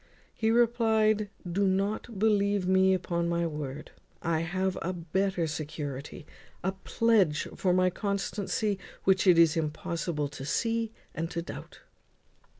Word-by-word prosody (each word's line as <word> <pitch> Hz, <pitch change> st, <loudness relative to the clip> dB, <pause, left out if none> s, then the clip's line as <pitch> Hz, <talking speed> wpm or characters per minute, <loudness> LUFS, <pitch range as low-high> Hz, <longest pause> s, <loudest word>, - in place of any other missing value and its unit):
He 220 Hz, -, 0 dB
replied, 220 Hz, -3 st, +3 dB, 0.2 s
"Don't 195 Hz, +4 st, 0 dB
believe 200 Hz, -2 st, +2 dB
me 190 Hz, 0 st, +4 dB
upon 170 Hz, -2 st, -1 dB
my 170 Hz, 0 st, +1 dB
word; 150 Hz, -2 st, -5 dB, 0.3 s
I 165 Hz, -2 st, +1 dB
have 185 Hz, +3 st, -1 dB
a 185 Hz, +2 st, -2 dB
better 180 Hz, +1 st, -1 dB
security, 150 Hz, 0 st, -5 dB, 0.4 s
a 190 Hz, -, +1 dB
pledge 190 Hz, -4 st, +2 dB
for 185 Hz, -, +1 dB
my 185 Hz, 0 st, +3 dB
constancy, 200 Hz, +1 st, -1 dB, 0.2 s
which 190 Hz, 0 st, +3 dB
it 180 Hz, -2 st, +7 dB
is 165 Hz, -1 st, +6 dB
impossible 160 Hz, -1 st, -2 dB
to 145 Hz, -1 st, -9 dB
see 230 Hz, +8 st, 0 dB, 0.2 s
and 165 Hz, 0 st, -3 dB
to 170 Hz, -1 st, -3 dB
doubt." -, -, -9 dB
185 Hz, 130 wpm, -29 LUFS, 165-205 Hz, 0.4 s, it